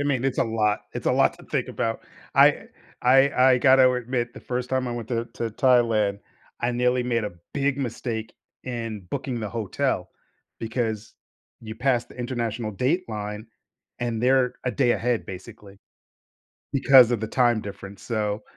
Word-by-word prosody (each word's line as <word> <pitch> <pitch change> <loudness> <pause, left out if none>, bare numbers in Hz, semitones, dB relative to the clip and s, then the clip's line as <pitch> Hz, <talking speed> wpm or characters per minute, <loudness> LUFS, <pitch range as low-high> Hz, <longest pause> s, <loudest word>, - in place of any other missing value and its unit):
I - - +1
mean, 135 -3 0
it's 135 -2 -1
a - - +3
lot 110 -2 0
it's - - -6
a - - +4
lot - - +3
to - - -14
think - - -2
about. 115 0 -2 0.3
I - - +5 0.4
I 135 +2 +5 0.2
I 125 - +3
gotta 130 0 +6
admit 125 0 -2
the - - -10
first 125 0 -3
time 130 -1 -1
I 120 - -3
went 120 -2 -5
to 115 -1 -2
to 115 -1 -3
Thailand, 110 -4 +2 0.4
I 120 +1 0
nearly 125 +1 +1
made 115 -2 0
a 105 - -4 0.2
big 140 -1 0
mistake 115 -3 -4 0.3
in 115 -6 -5
booking 125 -3 -3
the 110 -2 -4
hotel 110 -3 -2 0.5
because 110 -2 -3 0.5
you 110 -1 -8
passed 125 -1 0
the - - -15
international 120 -3 -3
dateline, 110 - -2 0.5
and 120 -2 -2
they're 130 -1 +3
a 125 - +1
day 130 -4 +2
ahead, 120 -1 -1
basically, 100 +1 -11 0.9
because 135 -3 +6
of 115 -3 0
the 110 - -2
time 120 -1 +2
difference, 100 -1 -9
so, 105 -2 -2
120 Hz, 170 wpm, -24 LUFS, 110-125 Hz, 0.9 s, gotta